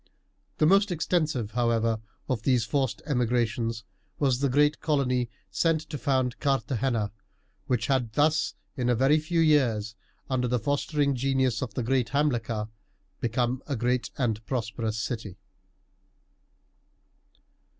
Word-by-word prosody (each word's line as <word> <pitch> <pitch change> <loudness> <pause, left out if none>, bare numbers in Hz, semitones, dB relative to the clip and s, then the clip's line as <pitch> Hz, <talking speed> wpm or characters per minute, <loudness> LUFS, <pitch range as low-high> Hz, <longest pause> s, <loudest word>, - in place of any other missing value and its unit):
The - - +3
most 195 +4 +4
extensive, 155 - 0
however, 115 -2 +1 0.3
of 125 -5 -1
these 125 -2 +2
forced 130 0 -1
emigrations 115 -3 0 0.3
was 130 -4 +2
the 140 0 +1
great 145 +3 +3
colony 125 -5 +1 0.2
sent 160 - +2
to 150 - -3
found 130 -3 0
Carthagena, 130 -5 0 0.6
which 125 -4 +1
had 125 -4 0
thus 155 +3 +2 0.2
in 125 -4 0
a 120 - +3
very 135 +6 +4
few 165 +2 -1
years, 120 -9 +2 0.3
under 130 -2 0
the 125 +1 +1
fostering 145 +3 0
genius 130 -2 +1
of 115 -5 -4
the 125 - -1
great 125 0 +1
Hamilcar, 120 -7 0 0.5
become 120 +2 0
a 140 - -1
great 125 +1 0
and 115 -4 -1
prosperous 115 -3 -2
city. 110 -4 -4
125 Hz, 130 wpm, -27 LUFS, 115-140 Hz, 0.6 s, most